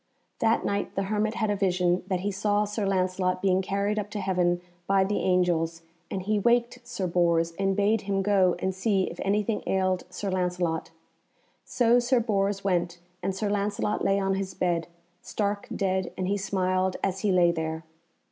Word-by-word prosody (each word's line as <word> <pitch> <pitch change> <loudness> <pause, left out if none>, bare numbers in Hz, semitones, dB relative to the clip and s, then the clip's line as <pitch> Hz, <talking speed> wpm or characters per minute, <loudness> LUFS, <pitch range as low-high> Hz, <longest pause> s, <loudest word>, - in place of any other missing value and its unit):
That 225 +1 +2
night 200 0 -2
the 195 - 0
hermit 215 +1 0
had 220 -2 0
a - - +1
vision 180 -2 +1
that 185 -2 -1
he 205 +2 -1
saw 205 +1 +1
Sir 210 0 -2
Lancelot 185 -1 0
being 190 0 +2
carried 200 +2 -1
up 205 0 -4
to 210 - -4
heaven 180 -2 +1 0.3
by 195 -1 +4
the 200 +2 -1
angels, 170 -3 +1 0.3
and 190 - -3
he 210 +2 +1
waked 240 +3 +2
Sir 240 -6 -4
Bors 170 -1 +2
and 195 0 +1
bade 205 +2 +2
him 195 -1 -1
go 190 -3 +3
and 190 - -1
see 195 0 +1
if - - -5
anything 210 +2 0
ailed 185 -1 +1
Sir 190 +2 -4
Lancelot. 180 -3 -1 0.8
So 240 -1 +3
Sir 245 +1 +2
Bors 200 -3 0
went 175 -2 0 0.2
and 190 +1 -2
Sir 210 +2 -2
Lancelot 205 +1 -1
lay 195 0 +3
on 195 0 0
his 195 0 -3
bed, 170 -2 0 0.3
stark 205 -1 -2
dead, 190 -1 -1
and 185 - -2
he 200 - +1
smiled 185 -1 0
as 190 -1 0
he 205 0 +1
lay 175 -2 +4
there. 160 -1 -3
195 Hz, 185 wpm, -27 LUFS, 185-205 Hz, 0.8 s, by